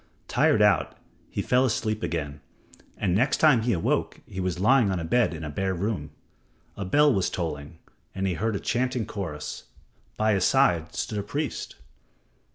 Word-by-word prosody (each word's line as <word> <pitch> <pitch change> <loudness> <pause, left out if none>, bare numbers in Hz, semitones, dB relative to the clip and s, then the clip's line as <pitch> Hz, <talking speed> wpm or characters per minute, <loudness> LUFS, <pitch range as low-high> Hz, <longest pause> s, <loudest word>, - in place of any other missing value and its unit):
Tired 105 - +3
out, 100 -6 +2 0.3
he - - -3
fell 125 +1 +3
asleep 110 -3 -1
again, 75 -6 -3 0.6
and 95 -3 0
next 125 +9 +2
time 150 -7 +5
he 120 +2 0
awoke 85 -6 0
he 95 - -8
was 90 -1 -2
lying 120 +2 +4
on 95 -2 -1
a - - -4
bed 120 +8 +2
in 80 -1 -7
a 75 - -4
bare 95 +4 -1
room. 90 -5 -2 0.7
A 100 - -4
bell 145 +9 +4
was 95 -4 +1
tolling, 75 -3 -5 0.4
and 95 0 -2
he 95 - +1
heard 110 +6 -1
a - - -2
chanting 125 -1 -1
chorus. 80 -7 -6 0.5
By 110 0 +2
his 95 -2 +1
side 90 -12 +2
stood 105 - -2
a - - -1
priest. 140 +9 -4
100 Hz, 175 wpm, -26 LUFS, 85-115 Hz, 0.7 s, time